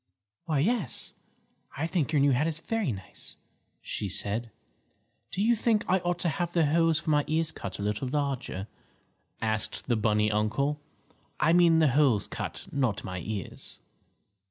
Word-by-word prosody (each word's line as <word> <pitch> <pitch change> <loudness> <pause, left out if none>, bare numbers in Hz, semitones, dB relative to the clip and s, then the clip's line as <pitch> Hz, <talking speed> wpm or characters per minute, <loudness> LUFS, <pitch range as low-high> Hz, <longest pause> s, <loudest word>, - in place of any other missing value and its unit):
"Why, 155 -3 0
yes, 200 - 0 0.6
I 150 - 0
think 165 -3 0
your 150 -3 +3
new 140 0 +5
hat 135 +5 +2
is 160 -2 -2
very 215 - -1
nice," 95 -4 -8 0.5
she 100 - -3
said. 105 +5 -1 0.8
"Do 195 - -1
you 235 +2 +4
think 220 -1 +1
I 185 +1 +3
ought 175 0 -1
to 175 - +2
have 175 +3 -2
the 165 -3 +4
holes 165 +1 +3
for 155 - -1
my 150 -1 +4
ears 160 0 +1
cut - - -6
a 100 - -4
little 105 +5 -1
larger?" 135 -8 -2 0.8
asked 110 -1 -2
the 120 - +1
bunny 105 -1 +2
uncle. 115 +8 0 0.6
"I 160 +2 +4
mean 170 -2 +6
the 160 -3 +5
holes 130 -6 +3
cut, - - -5
not 130 -7 0
my 90 -1 -4
ears." 100 +1 -6
145 Hz, 165 wpm, -28 LUFS, 110-165 Hz, 0.8 s, mean